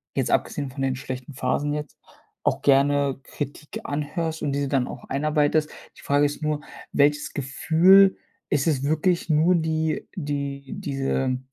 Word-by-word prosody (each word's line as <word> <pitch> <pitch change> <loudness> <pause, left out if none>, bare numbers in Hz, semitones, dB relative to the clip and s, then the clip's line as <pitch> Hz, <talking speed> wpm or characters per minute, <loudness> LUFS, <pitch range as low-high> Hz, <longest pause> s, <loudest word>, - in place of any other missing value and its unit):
jetzt - - 0
abgesehen 140 -2 0
von 135 +1 -7
den 135 -1 0
schlechten 130 +1 -7
Phasen 140 +3 0
jetzt, 150 -1 -5 0.5
auch - - 0
gerne 140 0 +3
Kritik 145 +1 -6
anhörst 155 +3 -3
und 145 -2 -1
diese 140 0 -1
dann 135 -3 +1
auch - - -9
einarbeitest. 150 +2 +1 0.3
Die - - -14
Frage 145 +1 +2
ist 145 +2 -3
nur, 150 -1 -1 0.3
welches 145 +1 +2
Gefühl 165 +8 +5 0.3
ist 140 +2 +1
es 140 -5 +1
wirklich 165 +4 +1
nur 160 +4 +4
die 160 -1 -1
die 140 -4 -3 0.2
diese 135 -2 -1
145 Hz, 150 wpm, -24 LUFS, 140-155 Hz, 0.5 s, Gefühl